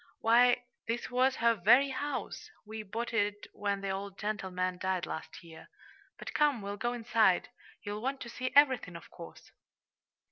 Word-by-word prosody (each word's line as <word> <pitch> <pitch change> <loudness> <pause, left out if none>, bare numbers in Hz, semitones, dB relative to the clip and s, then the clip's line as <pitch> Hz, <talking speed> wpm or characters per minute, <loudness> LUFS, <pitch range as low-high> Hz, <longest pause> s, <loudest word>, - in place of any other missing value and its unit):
Why, 245 +2 +5 0.2
this 235 +2 -3
was 255 +1 +3
her 235 0 +3
very 230 +8 +5
house 265 -3 -4 0.2
we 220 +1 -6
bought 225 +4 -5
it 205 -2 0
when 200 -1 -2
the 195 -1 -2
old 195 0 -5
gentleman 185 -4 -3
died 185 -1 -1
last 160 - -7
year. 165 -1 -13 0.5
But, - - -8
come, 290 -8 +2
we'll 200 0 -4
go 240 +3 -1
inside. 225 -5 +2 0.3
You'll 205 0 -5
want 270 +3 -2
to 235 - -6
see 255 +2 -4
everything, 260 -11 +4
of 170 - -11
course!" 170 - -12
220 Hz, 165 wpm, -31 LUFS, 195-245 Hz, 0.5 s, Why